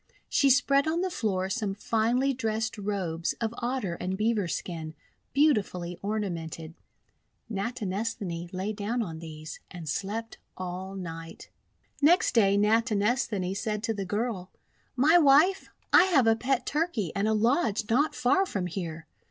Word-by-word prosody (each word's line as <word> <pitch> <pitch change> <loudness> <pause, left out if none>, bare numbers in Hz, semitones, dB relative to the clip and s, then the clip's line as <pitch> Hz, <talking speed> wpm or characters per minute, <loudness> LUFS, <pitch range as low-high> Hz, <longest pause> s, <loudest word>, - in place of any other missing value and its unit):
She 280 - +3
spread 275 +2 +4
on 330 +2 +1
the 375 0 -1
floor 190 - -1
some 200 -1 -2
finely 235 +6 +1
dressed 220 -2 -2
robes 185 -5 -2
of 225 -1 -3
Otter 240 -7 -2
and 185 +1 -2
Beaver 215 -2 +1
skin, 160 -2 -5 0.4
beautifully 200 - +1
ornamented. 170 -6 -4 0.8
Natinesthani 200 -5 -3
lay 190 +3 -3
down 220 +3 -2
on 165 -5 -6
these, 155 -1 -8
and 175 -3 -9
slept 210 +8 -3 0.2
all 185 +1 -5
night. 165 -3 -8 0.5
Next 335 +5 +4
day, 200 -4 +4
Natinesthani 210 -2 +1
said 210 0 -2
to 225 -1 0
the 200 -2 -3
girl: 205 -2 -2 0.2
— - - -38
"My 310 +7 +5
Wife, 310 +6 +5 0.2
I - - +8
have 305 -10 +4
a 225 0 +5
pet 255 +2 0
Turkey 295 - -1
and 200 +2 +1
a 220 - +2
lodge 225 - +1
not 260 +7 +2
far 260 +11 +2
from 190 - -2
here. 170 -2 -5
210 Hz, 145 wpm, -28 LUFS, 185-250 Hz, 0.8 s, I